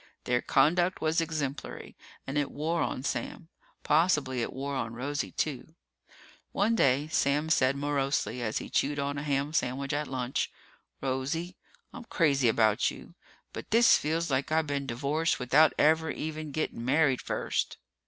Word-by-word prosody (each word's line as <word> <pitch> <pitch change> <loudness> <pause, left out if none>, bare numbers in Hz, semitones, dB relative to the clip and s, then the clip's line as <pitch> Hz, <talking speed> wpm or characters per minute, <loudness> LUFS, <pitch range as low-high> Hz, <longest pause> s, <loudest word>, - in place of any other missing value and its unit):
Their 125 0 +1
conduct 175 +6 +2
was 160 +1 +1
exemplary 150 -3 -4 0.3
and 135 - -5
it 145 -1 0
wore 160 +3 -2
on 130 - -2
Sam. 140 +5 -4 0.3
Possibly 150 -6 +2
it - - -2
wore 140 +2 -4
on 115 -3 -3
Rosie, 140 +4 -3
too. 155 +2 -3 0.8
One 215 +3 +1
day 140 - +2
Sam 150 +1 +1
said 130 -3 +3
morosely, 140 -4 -1
as 110 -2 -2
he - - -4
chewed 145 +1 0
on 140 0 -2
a - - -4
ham 145 0 -1
sandwich 135 -1 -1
at 150 +1 -1
lunch, 130 -1 -2 0.5
"Rosie, 140 +7 -2 0.4
I'm 240 - -9
crazy 140 - +2
about 110 -1 +3
you, - - -11 0.4
but - - -8
this 230 +2 +6
feels 160 +1 -1
like 135 +3 0
I 160 0 +3
been 140 -2 -3
divorced 140 +7 0
without 140 +5 +4
ever 160 +1 +3
even 155 0 -5
getting 140 -5 -3
married 135 0 +2
first." - - -2
145 Hz, 155 wpm, -29 LUFS, 130-160 Hz, 0.8 s, this